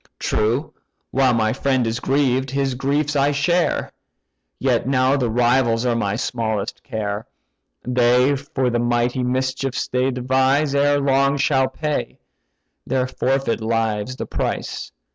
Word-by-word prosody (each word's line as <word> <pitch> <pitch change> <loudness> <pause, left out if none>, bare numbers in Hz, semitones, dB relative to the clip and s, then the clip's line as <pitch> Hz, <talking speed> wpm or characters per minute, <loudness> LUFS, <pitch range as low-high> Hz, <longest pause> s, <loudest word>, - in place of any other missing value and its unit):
True, 120 +8 -1 0.4
while 130 -2 +3
my 110 -1 +1
friend 130 -3 0
is 115 +1 -2
grieved, 135 -1 +1
his 135 0 -1
griefs 145 +3 -1
I 140 +1 +3
share; 170 +5 0 0.7
Yet - - 0
now 130 0 +3
the 125 -4 0
rivals 120 0 +2
are 120 -1 +1
my 105 -3 -1
smallest 110 -3 -3
care: 110 -3 -4 0.6
They 125 +2 +3
for 135 -2 -2
the 120 - 0
mighty 120 +1 0
mischiefs 130 +1 -1
they 125 +1 +1
devise, 130 +3 +1
Ere 145 0 +3
long 140 0 +2
shall 135 -1 +2
pay—their 135 - -5
forfeit 135 -3 -1
lives 110 +1 -1
the - - -5
price. - - -4
130 Hz, 130 wpm, -21 LUFS, 120-140 Hz, 0.7 s, while